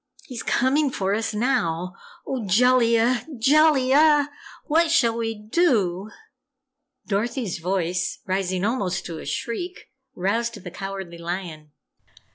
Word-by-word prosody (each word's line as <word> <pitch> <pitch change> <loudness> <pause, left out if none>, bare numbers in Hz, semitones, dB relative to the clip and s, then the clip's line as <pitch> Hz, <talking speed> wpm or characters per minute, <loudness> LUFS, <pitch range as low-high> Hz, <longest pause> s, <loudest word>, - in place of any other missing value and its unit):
He's 250 -4 -6
coming 275 +4 +2
for 195 -6 -1
us 220 +1 -1
now! 210 -7 -1 0.3
Oh, 260 -4 -3
Jellia, 235 +2 +3
JELLIA 290 +2 +4 0.3
what 330 +2 +2
shall 235 -8 +3
we 225 -1 -2
DO?" 210 - 0 1.0
Dorothy's 215 -1 -2
voice, 180 0 -1
rising 185 0 -1
almost 195 -6 -1
to 165 -2 -6
a - - -9
shriek, 265 +9 -5 0.2
roused 230 +6 -1
the 180 - -7
Cowardly 195 -2 -7
Lion. 170 -3 -6
225 Hz, 110 wpm, -23 LUFS, 185-260 Hz, 1.0 s, JELLIA